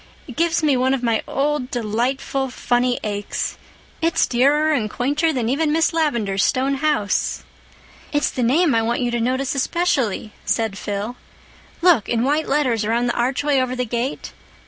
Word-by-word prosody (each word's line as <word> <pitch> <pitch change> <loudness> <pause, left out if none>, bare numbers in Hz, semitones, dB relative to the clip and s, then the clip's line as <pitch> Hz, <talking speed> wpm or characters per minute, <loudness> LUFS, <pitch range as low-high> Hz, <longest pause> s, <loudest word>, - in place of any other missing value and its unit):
"It - - -9
gives 335 0 +1
me 295 -3 +3
one 260 +1 +2
of 255 - -6
my 230 -2 +1
old, 280 -2 -1
delightful 250 +4 -1
funny 245 0 0
aches. 205 -1 -3 0.4
It's 330 +1 +2
dearer 290 +5 +2
and 235 -8 0
quainter 290 +8 0
than 250 -6 -1
even 295 +5 +1
Miss 325 +2 +2
Lavendar's 235 -12 0
stone 270 +2 +1
house." 290 -9 0 0.7
"It's 290 -1 +1
the 255 - -3
name 290 +7 +3
I 225 - +3
want 235 +3 -1
you 245 -1 0
to 240 -1 -1
notice 260 +3 0
especially," 265 - 0
said 225 -3 0
Phil. 205 +4 -4 0.7
"Look—in 240 - +3
white 295 +4 0
letters, 255 -6 +1
around 235 +3 0
the - - -5
archway 270 +3 +1
over 255 0 -1
the 250 0 -1
gate. 240 +3 -3
255 Hz, 165 wpm, -21 LUFS, 235-290 Hz, 0.7 s, me